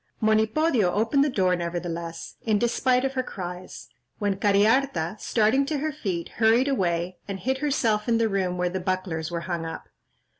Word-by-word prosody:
" - - -42
Monipodio 220 - +2
opened 230 +7 +3
the 295 - +1
door, 185 -7 +2
nevertheless, 170 -1 -5
in 215 -2 +2
despite 250 +3 +2
of 270 - -1
her 260 - 0
cries; 180 - -7 0.3
when 205 -2 0
Cariharta, 205 -2 +2
starting 225 +5 +2
to 300 0 -1
her 310 +2 -1
feet, 190 - -4
hurried 230 +4 +4
away, 180 -8 0
and 195 -1 -4
hid 265 +1 -1
herself 235 -7 0
in 230 - +3
the 225 0 +2
room 190 -3 -1
where 180 0 +1
the 185 +1 -2
bucklers 180 -3 -2
were 170 -1 -3
hung 170 -2 -3
up. 165 0 -7
205 Hz, 180 wpm, -25 LUFS, 180-250 Hz, 0.3 s, hurried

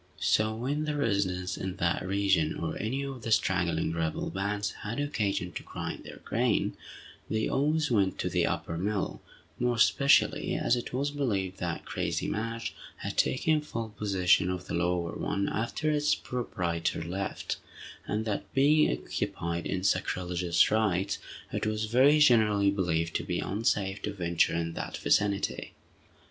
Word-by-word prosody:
So 110 0 +2
when 140 +6 -1
the 150 -1 -1
residents 100 -8 0
in 95 -1 -4
that 85 -1 0
region, 95 -4 +1
or - - -3
any 130 +7 -1
of 135 -3 -6
the 115 - -4
straggling 110 - +2
rebel 80 -1 -2
bands, 100 +2 -1
had 110 +5 -4
occasion 100 -11 -1
to - - -6
grind - - -6
their - - -11
grain, - - +1 0.5
they 110 0 0
always 150 +1 +1
went 100 -4 +2
to - - -1
the - - +1
upper 85 0 -2
mill, 100 +1 -2 0.4
more 125 0 +1
especially 115 +6 +4
as 120 - +2
it 120 - -4
was 140 +3 -1
believed 100 -10 -1
that 85 -1 -3
"crazy - - -2
Madge" 115 +2 -3 0.2
had - - -5
taken 155 +3 +2
full 115 -7 -5
possession 95 -3 +2
of 90 -1 -3
the - - -6
lower 85 0 0
one 100 - -1
after 135 +7 -1
its 150 0 +2
proprietor 85 -10 -2
left, 95 +4 -3 0.5
and 110 +1 -1
that, 105 -3 -3
being 150 +3 +5
occupied 85 +7 -3
in 95 -1 -2
sacrilegious 90 -2 +1
rites, 100 -3 +1 0.3
it - - -1
was 110 0 -1
very 130 +7 +5
generally 110 -8 +5
believed 85 -4 0
to - - -5
be 90 -1 -2
unsafe 100 -1 0
to 105 - -2
venture 85 -5 +1
in 85 0 -2
that - - -5
vicinity. 100 -1 +1
100 Hz, 155 wpm, -29 LUFS, 90-120 Hz, 0.5 s, being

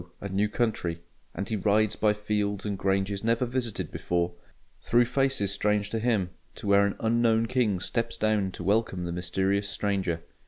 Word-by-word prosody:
a 100 - -5
new 100 +2 0
country: 105 -8 -1 0.4
and 100 - -4
he 110 - 0
rides 105 +1 +2
by 105 0 +3
fields 105 -1 -2
and 100 -2 -2
granges 95 +1 0
never 115 +2 +2
visited 120 -3 -2
before, 85 0 -1 0.5
through 120 +1 +3
faces 135 -5 +1
strange 105 0 0
to 115 - -1
him, 110 -6 +1 0.2
to 115 - -9
where 100 0 +5
an 100 - -3
unknown 115 0 +2
King 115 -6 +1
steps 115 +4 -2
down 105 -3 +1
to 90 - -8
welcome 100 -2 +1
the 85 - -3
mysterious 95 +3 0
stranger. 95 -5 -1
105 Hz, 170 wpm, -27 LUFS, 95-115 Hz, 0.5 s, where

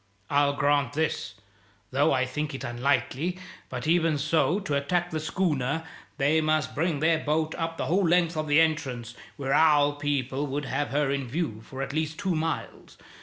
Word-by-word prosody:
I'll 145 0 +3
grant 145 -2 +1
this, 160 -8 -2 0.6
though 140 +4 +3
I 130 -1 +2
think 150 +2 -3
it - - -6
unlikely; 140 +7 0 0.3
but, 125 +1 -5
even 165 -1 +3
so, 155 +5 +2
to 190 -7 -3
attack 175 +5 0
the 160 - -2
schooner 155 -2 -1 0.3
they 150 +3 +3
must 155 -1 0
bring 155 -1 0
their 160 0 +3
boat 155 +1 0
up 165 0 -3
the - - -2
whole 180 +2 +2
length 170 0 +3
of 155 0 -2
the 145 +1 +5
entrance, 135 -8 0 0.2
where 135 -1 -1
our 145 -2 +5
people 145 -1 -1
would 145 +2 -3
have 145 +1 -1
her 145 0 +1
in 140 -2 -2
view 130 -5 -3
for 135 +4 -6
at 135 - -5
least 155 0 -2
two 195 -3 -1
miles. 160 0 -4
150 Hz, 180 wpm, -27 LUFS, 140-160 Hz, 0.6 s, the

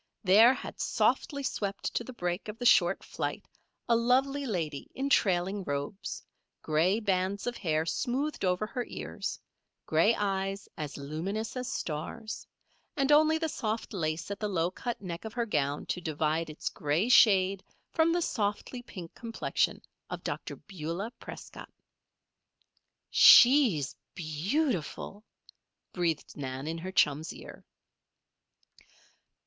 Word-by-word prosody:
There 220 +7 +7
had - - -8
softly 280 -2 +1
swept 200 -6 -3
to - - -1
the 255 - -8
break 180 -4 -3
of 210 +1 -6
the 245 - -5
short 180 -5 +5
flight, - - -4 0.4
a 235 - +4
lovely 265 +4 +2
lady 160 - -3
in 275 +1 -2
trailing 190 -1 +2
robes, 145 +6 -4 0.4
gray 165 +7 +2
bands 195 -1 0
of 245 0 -2
hair 160 -4 0
smoothed 270 - -2
over 180 +2 +1
her 245 +3 -3
ears, - - -5 0.5
gray 165 +9 +3
eyes 195 -1 -2
as 150 -2 -5
luminous 170 - -4
as 250 -1 -3
stars; 175 +8 -5 0.5
and 275 0 +2
only 310 +2 +6
the 320 0 -1
soft 220 -7 -3
lace 160 0 -2
at 200 - -4
the 210 - -1
low 175 -2 0
cut 235 +4 -4
neck 170 -2 -5
of 220 -1 -7
her 240 -1 -1
gown 145 -8 -1
to 180 - -3
divide 160 0 -1
its 155 - -6
gray 150 +8 0
shade 195 -6 +5 0.3
from 325 0 +3
the 345 0 +1
softly 210 +2 -2
pink 180 -8 -10
complexion 230 -2 -1 0.3
of - - -6
Dr. - - -4
Beulah 185 +3 -5
Prescott. - - -10 1.4
"She's 240 - +7 0.2
beautiful," 190 - -2 0.7
breathed 170 -4 -1
Nan 130 -1 -5
in 165 +1 -3
her 185 +3 -5
chum's 150 -3 +2
ear. - - -11
195 Hz, 135 wpm, -30 LUFS, 165-235 Hz, 1.4 s, There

